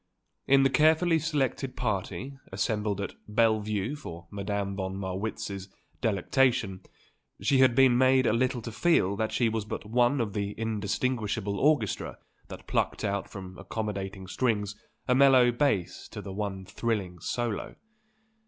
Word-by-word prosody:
In 135 Hz, 0 st, +6 dB
the 135 Hz, -, +4 dB
carefully 160 Hz, +4 st, +4 dB
selected 140 Hz, -4 st, -1 dB
party 105 Hz, +3 st, -3 dB, 0.2 s
assembled 105 Hz, +1 st, -1 dB
at 100 Hz, -, -4 dB
Belle 110 Hz, 0 st, +3 dB
Vue 105 Hz, +5 st, -2 dB
for 85 Hz, -, -9 dB
Madame 100 Hz, 0 st, -2 dB
von 95 Hz, 0 st, -3 dB
Marwitz's 95 Hz, 0 st, -4 dB, 0.3 s
delectation, 115 Hz, -1 st, +1 dB, 0.6 s
she 135 Hz, -, +2 dB
had 130 Hz, -2 st, +5 dB
been 130 Hz, -2 st, +6 dB
made 130 Hz, 0 st, +5 dB
a 110 Hz, -, +3 dB
little 125 Hz, 0 st, 0 dB
to 115 Hz, -, -5 dB
feel 115 Hz, -, +2 dB
that 110 Hz, 0 st, -1 dB
she 120 Hz, -, +2 dB
was 110 Hz, -1 st, -1 dB
but 105 Hz, -, -6 dB
one 120 Hz, +5 st, +2 dB
of 110 Hz, -4 st, -1 dB
the 100 Hz, -1 st, -2 dB
indistinguishable 110 Hz, -1 st, -1 dB
orchestra 140 Hz, -, +1 dB, 0.3 s
that -, -, -10 dB
plucked -, -, -1 dB
out 100 Hz, -1 st, -1 dB
from 95 Hz, -2 st, -9 dB
accommodating 100 Hz, -3 st, -4 dB
strings 105 Hz, -1 st, -1 dB, 0.3 s
a 125 Hz, -, +4 dB
mellow 130 Hz, -2 st, +6 dB
bass 115 Hz, -8 st, 0 dB
to -, -, -8 dB
the 95 Hz, -, -7 dB
one 95 Hz, -2 st, -4 dB
thrilling 95 Hz, -4 st, -2 dB
solo. 120 Hz, +5 st, -3 dB
110 Hz, 145 wpm, -28 LUFS, 100-130 Hz, 0.6 s, In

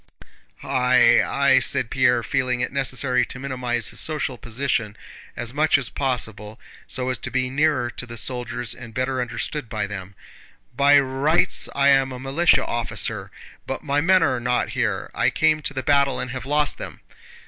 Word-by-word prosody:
"I, 125 Hz, -2 st, +4 dB
I..." 140 Hz, -1 st, +3 dB
said 130 Hz, -1 st, 0 dB
Pierre, 125 Hz, -3 st, +2 dB
feeling 130 Hz, -2 st, -1 dB
it 125 Hz, -, -2 dB
necessary 130 Hz, -2 st, +1 dB
to -, -, -8 dB
minimize 125 Hz, -3 st, -2 dB
his -, -, -7 dB
social 150 Hz, -4 st, -2 dB
position 115 Hz, -3 st, -2 dB, 0.4 s
as 120 Hz, 0 st, -4 dB
much 155 Hz, +1 st, +3 dB
as 130 Hz, -4 st, -4 dB
possible 110 Hz, -5 st, -3 dB, 0.3 s
so 130 Hz, -1 st, -3 dB
as 125 Hz, -, -2 dB
to -, -, -4 dB
be 130 Hz, 0 st, -1 dB
nearer 140 Hz, -4 st, +1 dB
to 125 Hz, -, -7 dB
the 120 Hz, 0 st, -9 dB
soldiers 120 Hz, -1 st, -3 dB
and 115 Hz, -1 st, -11 dB
better 130 Hz, 0 st, -1 dB
understood 125 Hz, +1 st, -4 dB
by 110 Hz, -2 st, -2 dB
them. 100 Hz, -1 st, -8 dB, 0.6 s
"By 140 Hz, +1 st, +6 dB
rights 140 Hz, +6 st, +1 dB
I 140 Hz, 0 st, +4 dB
am 135 Hz, -1 st, +3 dB
a 125 Hz, -, -7 dB
militia 140 Hz, +6 st, +2 dB
officer, 120 Hz, -1 st, -2 dB, 0.4 s
but 135 Hz, -, -4 dB
my 145 Hz, -1 st, +1 dB
men 185 Hz, +2 st, +4 dB
are 125 Hz, -, +1 dB
not 125 Hz, +1 st, 0 dB
here. -, -, -2 dB
I -, -, +2 dB
came 155 Hz, -1 st, +2 dB
to 140 Hz, -, -3 dB
the 130 Hz, -, -3 dB
battle 140 Hz, -2 st, +2 dB
and 125 Hz, -, -4 dB
have 130 Hz, 0 st, -6 dB
lost 150 Hz, +1 st, 0 dB
them." -, -, -8 dB
130 Hz, 175 wpm, -22 LUFS, 120-140 Hz, 0.6 s, By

